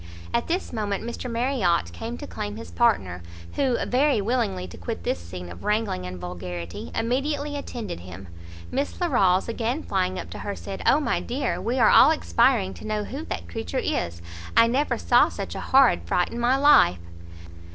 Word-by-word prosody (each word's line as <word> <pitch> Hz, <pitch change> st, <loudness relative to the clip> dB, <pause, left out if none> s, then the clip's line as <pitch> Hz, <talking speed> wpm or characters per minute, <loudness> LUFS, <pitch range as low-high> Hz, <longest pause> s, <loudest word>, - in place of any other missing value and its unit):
At 235 Hz, -, 0 dB
this 350 Hz, -3 st, -2 dB
moment 205 Hz, -3 st, -2 dB
Mr 235 Hz, +2 st, -5 dB
Marriot 230 Hz, -8 st, +1 dB
came 230 Hz, +2 st, -5 dB
to 290 Hz, -, -7 dB
claim 210 Hz, -5 st, -5 dB
his 230 Hz, -, -9 dB
partner, 95 Hz, -, +1 dB, 0.3 s
who, 260 Hz, -3 st, +1 dB
very 270 Hz, 0 st, +2 dB
willing 195 Hz, -, -1 dB
to 85 Hz, -, -11 dB
quit 85 Hz, 0 st, -5 dB
this 90 Hz, -, -1 dB
scene 90 Hz, +1 st, -8 dB
of 90 Hz, -, -11 dB
wrangling 210 Hz, -, -1 dB
and 90 Hz, 0 st, -6 dB
vulgarity, 90 Hz, -2 st, -6 dB
immediately 285 Hz, +5 st, -1 dB
attended 240 Hz, -, -5 dB
him. 90 Hz, +2 st, -10 dB, 0.4 s
Miss 280 Hz, +1 st, -2 dB
Larolles, 195 Hz, -, +3 dB
again 235 Hz, +6 st, -2 dB
flying 185 Hz, -1 st, -1 dB
up -, -, -6 dB
to -, -, -7 dB
her, 200 Hz, -, -4 dB
said 195 Hz, -, -7 dB
"O 290 Hz, -, +6 dB
my 300 Hz, -, 0 dB
dear, 235 Hz, -9 st, -2 dB
we 235 Hz, +6 st, -1 dB
are 230 Hz, -4 st, +5 dB
all 275 Hz, -, +8 dB
expiring 235 Hz, -9 st, +2 dB
to -, -, -9 dB
know 215 Hz, -1 st, -1 dB
who 280 Hz, +9 st, -6 dB
that 85 Hz, -, -5 dB
creature 85 Hz, -, -4 dB
is! 85 Hz, 0 st, -2 dB, 0.3 s
I -, -, +8 dB
never 260 Hz, +6 st, +1 dB
saw -, -, +4 dB
such -, -, -6 dB
a -, -, -5 dB
horrid 265 Hz, -1 st, +4 dB
fright 180 Hz, -, +1 dB
in 235 Hz, -, -5 dB
my 245 Hz, +3 st, +3 dB
life!" 280 Hz, -, +6 dB
225 Hz, 185 wpm, -25 LUFS, -, 0.4 s, all